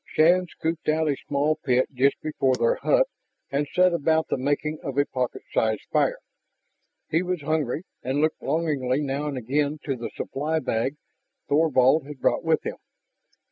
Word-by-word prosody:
Shann 180 +3 +3
scooped 160 -1 -3
out 160 +1 +2
a 145 - +2
small 145 +2 +1
pit 130 -4 +1
just 135 +2 +2
before 135 -4 +1
their 115 -2 +2
hut - - +3 0.5
and 145 +1 0
set 180 0 +4
about 160 0 +1
the - - +1
making 145 +3 -1
of 140 -3 -5
a 145 - +4
pocket 125 -3 -3
sized 110 -2 +1
fire. - - +2 0.9
He 160 - +3
was 180 -2 -2
hungry 155 0 -1 0.2
and 130 +3 -1
looked 155 +1 +1
longingly 145 -5 0
now 140 +1 -2
and 140 -3 -3
again 140 +5 0
to 135 - -2
the 120 -1 -5
supply 155 +4 -2
bag 130 -2 -1 0.5
Thorvald 145 -1 +3
had 145 -2 -9
brought - - +1
with - - +2
him. - - -4
145 Hz, 170 wpm, -25 LUFS, 130-160 Hz, 0.9 s, set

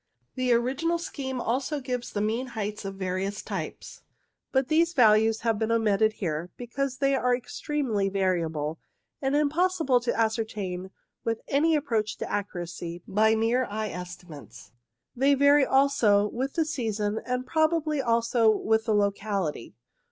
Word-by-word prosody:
The 255 -1 0
original 270 +8 +1
scheme 275 -7 -5
also 265 +5 -1
gives 250 -2 -4
the 205 - -2
mean 225 +5 -1
heights 210 -1 -3
of 195 0 -5
the 190 -1 -5
various 190 +3 -2
types, - - -6 0.5
but 265 -1 +1
these 330 +3 +2
values 220 -3 +4
have 225 -2 0
been 220 0 0
omitted 220 -1 +2
here 170 -4 -3
because 255 +2 -3
they 275 0 +2
are 250 -2 +2
extremely 245 -5 -2
variable, 165 -5 -1 0.4
and 270 0 0
impos 330 +6 +2
sible 260 -6 +3
to 240 -1 -1
ascertain 215 -5 -2 0.3
with 225 -1 -2
any 315 +4 +3
approach 230 -8 -1
to - - -5
accuracy 175 -3 -4
by 220 +2 +3
mere 230 +3 +1
eye 215 0 -3
estimates. 165 - -10 0.4
They 275 +3 +4
vary 285 0 +5
also 265 -7 +4
with 260 +5 -3
the 325 - +2
season, 220 -8 -2
and 250 0 -2
probably 315 0 +1
also 230 -1 +2
with 220 +1 +1
the 220 -2 +2
locality. 200 - -1
225 Hz, 150 wpm, -27 LUFS, 205-270 Hz, 0.5 s, vary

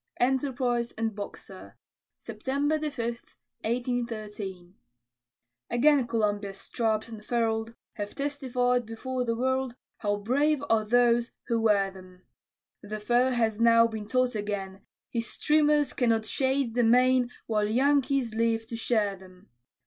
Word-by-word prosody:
ENTERPRISE 250 -2 0
AND 225 0 -2
BOXER 200 -2 -9 0.4
[September 285 +3 -1
5, 285 -7 -3 0.6
1813] 215 -6 -3 1.0
Again 270 +1 +4
Columbia's 205 -3 -1
stripes, 220 +1 -1
unfurl'd, 225 0 -2 0.2
Have 205 -1 -6
testified 250 -4 0
before 250 +3 -3
the 230 -1 -1
world, 260 0 -1 0.2
How 205 -1 0
brave 280 +8 +1
are 220 -1 +3
those 240 +1 +3
who 230 -1 0
wear 200 -3 +2
'em; 185 -1 -14 0.6
The 215 0 -6
foe 240 +4 +2
has 225 -4 0
now 230 0 +6
been 220 -2 -4
taught 255 +2 +1
again 205 -2 -4 0.3
His 230 -1 -2
streamers 300 -2 +2
cannot 230 -4 +1
shade 265 0 0
the 245 0 +2
main 250 +1 +4 0.2
While 210 -2 0
Yankees 270 0 +2
live 225 0 +1
to 230 - -4
share 215 -4 0
'em. 185 +1 -18
230 Hz, 125 wpm, -28 LUFS, 215-255 Hz, 1.0 s, now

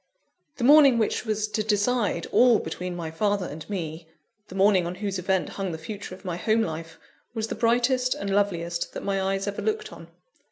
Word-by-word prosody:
The 245 - -3
morning 280 -2 +7
which 225 +1 0
was 215 0 0
to 215 - -1
decide 215 +2 +1
all 245 -2 +6
between 180 +1 -5
my 165 -2 -5
father 200 +2 0
and 155 +2 -8
me, 165 -4 -5 0.4
the 185 - -10
morning 195 -2 +4
on 175 - -4
whose 195 -1 -3
event 190 +1 0
hung 195 -2 -4
the 160 - -4
future 200 +3 -7
of 190 - -19
my 175 -2 -3
home 220 +4 +2
life, 165 -1 -6 0.4
was 220 0 -2
the - - -2
brightest 245 +2 +2
and 200 - -5
loveliest 170 -4 -1
that - - -6
my 195 -1 0
eyes 195 0 -1
ever 200 -1 -3
looked 435 0 -2
on. - - -12
200 Hz, 200 wpm, -26 LUFS, 180-225 Hz, 0.4 s, morning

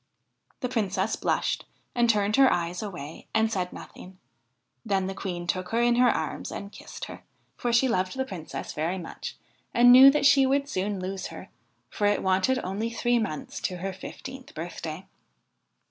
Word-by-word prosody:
' - - -40
The 250 - 0
Princess 205 -3 0
blushed - - -1 0.3
and 240 -1 +2
turned 210 -1 +3
her 270 -1 +7
eyes 175 +1 -1
away 165 -8 -7
and 220 0 +3
said 180 -4 -1
nothing; 185 0 -11 0.7
then 195 -4 0
the 190 - -3
Queen 180 -2 -4
took 185 +1 -2
her 230 - 0
in 240 0 +3
her 250 0 +6
arms - - -2
and 200 0 -6
kissed - - -8
her, - - -10 0.3
for 240 - -1
she 235 +3 +4
loved 185 -1 0
the 265 - 0
Princess 180 -9 -6
very 165 +5 -1
much 170 -3 -7 0.4
and 245 +1 +8
knew 260 +2 +11
that 285 0 +2
she 275 -1 +6
would 280 +1 +1
soon 200 -5 -2
lose 190 +1 -4
her, - - -10 0.4
for 205 - +1
it 205 - +1
wanted 190 +7 +2
only 200 +5 -2
three 240 +1 +1
months 155 -10 -4
to 180 - -3
her 190 +2 -4
fifteenth 260 +6 -9
birthday. 165 +1 -6
200 Hz, 180 wpm, -27 LUFS, 185-240 Hz, 0.7 s, knew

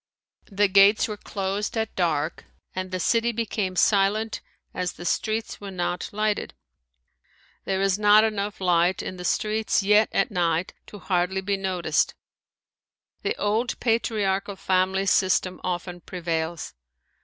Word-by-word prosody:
The 205 +1 +3
gates 200 +2 +5
were 215 - -4
closed 200 +2 -3
at 220 -1 -2
dark 160 -3 -1 0.3
and 185 0 -3
the 185 0 -3
city 230 +6 +2
became 210 -4 -2
silent 210 +3 +2 0.3
as 180 -2 -2
the 175 - -10
streets 220 +5 -2
were 200 - -6
not 180 -1 -3
lighted. 215 0 -1 1.1
There 190 0 0
is 195 0 +1
not 210 +1 +6
enough 210 -2 -2
light 180 0 +2
in 185 - -6
the 180 - -7
streets 215 +3 0
yet 210 +2 +4
at - - +1
night 170 -2 0
to 205 - -10
hardly 185 0 0
be 200 +1 0
noticed. 185 -5 0 1.1
The - - -1
old 220 +4 -1
patriarchal 210 -4 0
family 190 +1 +1
system 185 -1 +2
often 175 0 -4
prevails. 165 -2 -3
195 Hz, 135 wpm, -25 LUFS, 180-210 Hz, 1.1 s, not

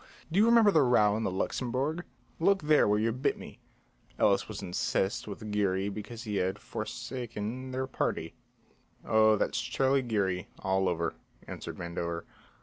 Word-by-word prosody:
Do 180 - +2
you 220 - +6
remember 230 -3 +6
the 160 - +5
row 105 -6 +4
in 110 - -1
the 110 - 0
Luxembourg? 130 - -2 0.3
Look 195 +1 +3
there 150 -4 +5
where 105 0 +3
you 110 +2 +1
bit 130 +5 0
me." - - -11 0.6
Ellis - - +3
was - - -6
incensed 95 +3 -1
with 105 +1 -6
Geary 100 -1 +1
because 110 +3 -7
he 105 -4 -2
had 95 +2 0
forsaken 115 +2 -5
their 130 +1 -2
party. 130 - -2 0.7
"Oh, 110 0 +5
that's - - 0
Charlie 135 0 +1
Geary, 100 -7 -1
all 95 0 +1
over," 85 -1 -1 0.3
answered - - -7
Vandover. 85 -1 -4
110 Hz, 155 wpm, -30 LUFS, 95-130 Hz, 0.7 s, you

